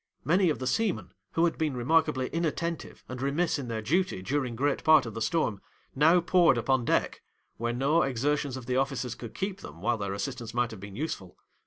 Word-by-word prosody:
'Many 180 +5 +4
of 150 - 0
the 130 - -5
seamen, 200 - -1 0.2
who 165 - +3
had 165 - -1
been 150 -5 0
remarkably 135 0 +2
inattentive 170 0 -3
and 125 0 -6
remiss 145 +4 +1
in 130 - -5
their 110 -2 -3
duty 170 - 0
during 130 +1 -1
great 140 +3 0
part 155 -4 +6
of 115 - -6
the 115 - -5
storm, 110 -3 0 0.3
now 160 +6 +5
poured 175 -5 +4
upon 125 +1 +1
deck, - - 0 0.4
where 120 +1 -1
no 140 +7 +2
exertions 135 +1 0
of 130 - -8
the 125 +1 0
officers 135 -3 -1
could 120 -1 -9
keep 195 0 -3
them, 80 - -10
while 115 +5 0
their 100 -1 -2
assistance 115 +2 -5
might 120 -1 +1
have 110 - -9
been 100 0 -9
useful. 95 - -5
135 Hz, 205 wpm, -28 LUFS, 120-160 Hz, 0.4 s, part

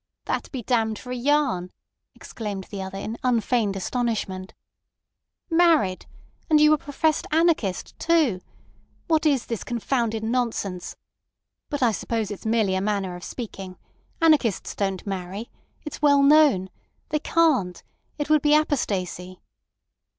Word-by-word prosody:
"That - - -3
be 255 -4 -5
damned 220 -2 0
for 250 - -9
a - - -2
yarn," 250 -9 +1 0.4
exclaimed 205 -4 -6
the 200 -2 -5
other 190 0 -6
in 220 +4 -5
unfeigned 230 -4 +1
astonishment. 195 -3 -3 0.9
"Married! 325 - +3 0.4
And 305 -1 +5
you 300 0 +6
a - - +3
professed 300 +2 0
anarchist, 315 - +1
too! 310 - +2 0.6
What 320 -2 +2
is 275 -5 +2
this 230 -3 -4
confounded 235 -2 -1
nonsense? 225 -6 -2 0.7
But 290 -3 -1
I 235 - +4
suppose 220 0 -2
it's 205 +2 -6
merely 220 -4 +2
a 190 - 0
manner 200 -3 -1
of 175 - -10
speaking. 195 -6 -7 0.4
Anarchists 300 - +2
don't 195 -2 -2
marry. 195 +3 -5 0.3
It's 300 - -7
well 285 -1 +5
known. 280 -11 +5 0.4
They 305 -1 0
can't. 295 - +1 0.3
It 295 - -2
would 305 -1 +4
be 295 +1 +4
apostasy." 185 - -1
230 Hz, 135 wpm, -24 LUFS, 195-295 Hz, 0.9 s, you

